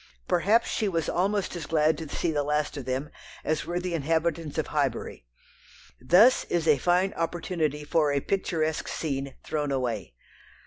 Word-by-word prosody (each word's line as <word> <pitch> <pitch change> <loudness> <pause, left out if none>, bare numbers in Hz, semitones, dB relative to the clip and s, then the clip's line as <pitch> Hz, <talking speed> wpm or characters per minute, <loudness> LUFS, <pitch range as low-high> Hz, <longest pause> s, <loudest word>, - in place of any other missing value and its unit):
Perhaps 205 +7 +3
she 215 - 0
was 165 -5 -1
almost 195 +1 0
as 170 - -5
glad 155 0 +3
to 160 -3 -6
see 170 - -1
the 150 -2 0
last 150 +1 -1
of 140 -4 -6
them 130 +3 -3 0.3
as 155 0 -1
were 175 +1 -1
the 180 -1 -3
inhabitants 160 0 -1
of - - +1
Highbury. - - -2 0.7
Thus 190 - +6
is 170 -2 -1
a 150 -3 +5
fine 180 +5 +2
opportunity 165 -3 -2
for 150 0 +2
a 140 - +2
"picturesque" 160 -2 -1
scene 140 -3 -3
thrown 150 -2 -2
away. 120 - -2
160 Hz, 165 wpm, -27 LUFS, 145-175 Hz, 0.7 s, Thus